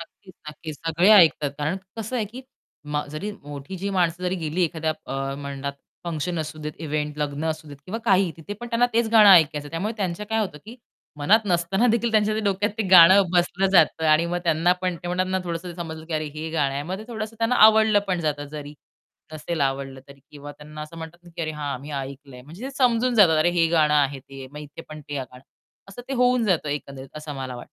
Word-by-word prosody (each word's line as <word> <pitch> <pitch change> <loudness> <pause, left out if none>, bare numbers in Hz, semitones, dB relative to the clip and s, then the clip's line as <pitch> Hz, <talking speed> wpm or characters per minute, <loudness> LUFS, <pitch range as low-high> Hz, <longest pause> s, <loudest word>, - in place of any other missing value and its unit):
नक्कीच, 185 +3 -14 0.2
नक्कीच. 150 0 -8
सगळे 170 +5 +3
ऐकतात. 160 -7 +5
कारण 150 +5 -1 0.2
कसं 225 +3 -4
आहे, 225 - 0
की 240 +6 -10 0.5
म 150 - +1
जरी 155 +8 -5
मोठी 145 +5 -8
जी 195 +2 -4
माणसं 180 -2 0
जरी 180 +1 -1
गेली 160 +4 -1
एखाद्या 160 -1 -2
अ, 135 0 -3
म्हणतात 140 0 -5 0.3
फंक्शन 170 +1 -3
असू 155 0 -5
देत, 150 - -4
इवेंट 150 -1 -3
लग्न 145 +1 -3
असू 155 -1 -3
देत 145 - -10
किंवा 220 +5 -4
काहीही 195 -4 +3
तिथे 165 +5 -8
पण 240 - -6
त्यांना 235 +1 +3
तेच 230 0 +2
गाणं 215 -2 +8
ऐकायचं. 155 -5 +5
त्यामुळे 190 +7 -3
त्यांचं 190 0 -3
काय 225 - +1
होतं, 185 -8 -4
की 230 +3 -11 0.4
मनात 205 +10 +4
नसताना 180 +4 +1
देखील 235 0 +1
त्यांच्या 215 0 +2
डोक्यात 200 +1 0
ते - - +2
गाणं 185 +2 +8
बसलं 180 +2 +2
जातं. 165 -3 +4
आणि 155 +2 +4
मग 175 +1 -2
त्यांना 165 +1 +3
पण 180 -2 -1
ते 175 - -6
म्हणतात 180 +1 0
ना 190 - +1
थोडसं 170 +1 -4
ते - - -9
समजलं, 160 -2 -7
की 165 - -7
अरे 155 0 -1
हे 155 +1 -5
गाणं 145 -4 0
आहे. 140 - -2
मग 185 +5 -5
ते 215 - -9
थोडंसं 220 -1 -6
त्यांना 230 +2 +1
आवडलं 220 -1 +5
पण 180 -2 0
जातं, 150 -2 -2
जरी 150 -1 -8 0.6
नसेल 155 +1 -4
आवडलं 135 -1 -2
तरी. 140 0 -15
किंवा 145 0 -10
त्यांना 150 +1 -11
असं 155 +2 -10
म्हणतात 160 +1 -9
ना, 175 - -14
की - - -3
अरे 155 - -2
हां, 145 -4 -4
मी 145 +2 -9
ऐकलंय. 135 -1 -10
म्हणजे 165 - -12
ते 270 - -4
समजून 250 -1 +2
जातात. 185 -8 +6
अरे 165 +3 +3
हे 170 -1 +2
गाणं 155 -3 +3
आहे 140 -2 +2
ते 135 0 -11
मग 150 - -9
इथे 145 -1 -10
पण 155 0 -9
ते 145 - -4
गाणं. 125 0 -13 0.5
असं 195 +5 -10
ते 270 - -2
होऊन 250 -1 +3
जातं 175 -7 +1
एकंदरीत 140 -2 -6
असं 150 -1 -7
मला 130 -2 -6
वाटतं. 120 - -9
165 Hz, 225 wpm, -24 LUFS, 150-195 Hz, 0.6 s, गाणं